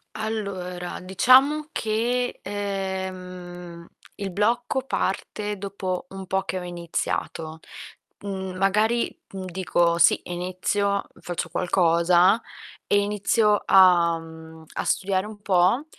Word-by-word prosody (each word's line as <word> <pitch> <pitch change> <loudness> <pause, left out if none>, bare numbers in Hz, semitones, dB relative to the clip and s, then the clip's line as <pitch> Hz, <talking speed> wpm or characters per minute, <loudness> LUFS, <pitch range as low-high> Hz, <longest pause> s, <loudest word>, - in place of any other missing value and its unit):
Allora 195 -5 -4
diciam 265 - +4
che, 240 +3 -1
ehm, 185 -3 -5 0.3
il 200 -1 -4
blocco 240 +6 +1
parte 210 -3 -2
dopo 190 -2 -4
un 190 -1 -8
po' 190 +1 0
che 190 -1 -3
ho - - -6
iniziato. 165 -2 -4 0.6
Mhmm, 190 -2 -5
magari, 210 +5 +1 0.2
mhmm, 190 -1 -5
dico: 175 -2 +1
"Sì, 170 - +5
inizio, 185 +3 -1
faccio 175 0 -4
qualcosa" 175 +3 +3 0.5
e 205 - +4
inizio 210 +1 +2
a 175 -3 +6
mhmm, 160 0 -12
a - - -3
studiare 190 0 0
un 210 -1 -10
po' 195 - +3
190 Hz, 110 wpm, -24 LUFS, 175-205 Hz, 0.6 s, a